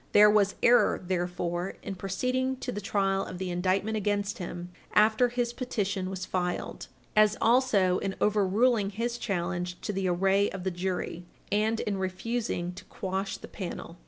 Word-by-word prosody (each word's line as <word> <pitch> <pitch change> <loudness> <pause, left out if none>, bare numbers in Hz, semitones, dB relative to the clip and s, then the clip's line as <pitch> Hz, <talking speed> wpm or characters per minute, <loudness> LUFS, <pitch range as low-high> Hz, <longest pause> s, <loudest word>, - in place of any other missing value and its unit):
There 210 0 +8
was 205 -1 +3
error, 245 +1 +5
therefore, 175 0 -2
in 195 - -4
proceeding 255 +8 -1
to - - -3
the 205 - -4
trial 195 -1 +1
of 185 - -7
the 185 0 -3
indictment 190 +5 0
against 205 0 -1
him 175 0 -6 0.2
after 220 +3 +5
his 240 0 -1
petition 200 -7 -2
was 185 -1 -4
filed 180 -1 -3 0.3
as 215 0 +5
also 225 -7 +3
in 195 -1 -3
overruling 210 +2 +3
his 235 +4 -3
challenge 175 -2 -2
to 210 - -3
the 190 -1 -1
array 195 +3 +3
of 195 -2 -6
the 190 - -1
jury 180 -1 -3 0.2
and 215 +2 +2
in 200 -2 -2
refusing 190 -1 -2
to 180 - -11
quash 190 +1 -3
the - - -10
panel. 175 -2 -7
195 Hz, 160 wpm, -28 LUFS, 185-215 Hz, 0.3 s, There